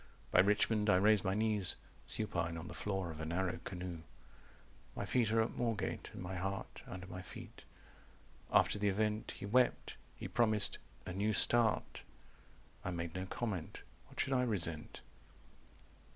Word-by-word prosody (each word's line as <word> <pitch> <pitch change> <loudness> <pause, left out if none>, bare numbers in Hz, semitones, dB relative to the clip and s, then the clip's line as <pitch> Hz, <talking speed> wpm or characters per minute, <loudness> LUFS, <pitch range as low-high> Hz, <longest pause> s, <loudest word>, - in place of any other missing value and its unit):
By - - +5
Richmond 105 +2 +4
I 90 - +7
raised 105 +1 +5
my 95 +1 +1
knees 105 -3 +1 0.3
Supine 85 0 -1
on 80 +2 -6
the - - -7
floor 95 -4 -2
of 80 0 -7
a - - -2
narrow 90 +1 -1
canoe." 90 -3 -5 0.9
"My - - -2
feet 120 -4 +2
are 115 0 +4
at 110 - -3
Moorgate, 115 -3 -1
and - - -7
my 90 +1 -4
heart 95 +2 -4
Under 95 0 -6
my 90 0 -7
feet. 90 - -10 0.9
After 105 - +4
the 100 0 +3
event 105 +2 0
He - - -6
wept. 125 +4 +2 0.2
He - - -5
promised 110 -3 +2 0.3
'a 90 - -4
new 105 +3 +1
start'. 115 -1 +3 0.8
I - - -2
made 85 -2 -3
no 95 0 -3
comment. 100 -6 -3 0.2
What - - -13
should 135 - +2
I 130 - +4
resent?" 85 -10 -2
100 Hz, 160 wpm, -36 LUFS, 90-110 Hz, 0.9 s, I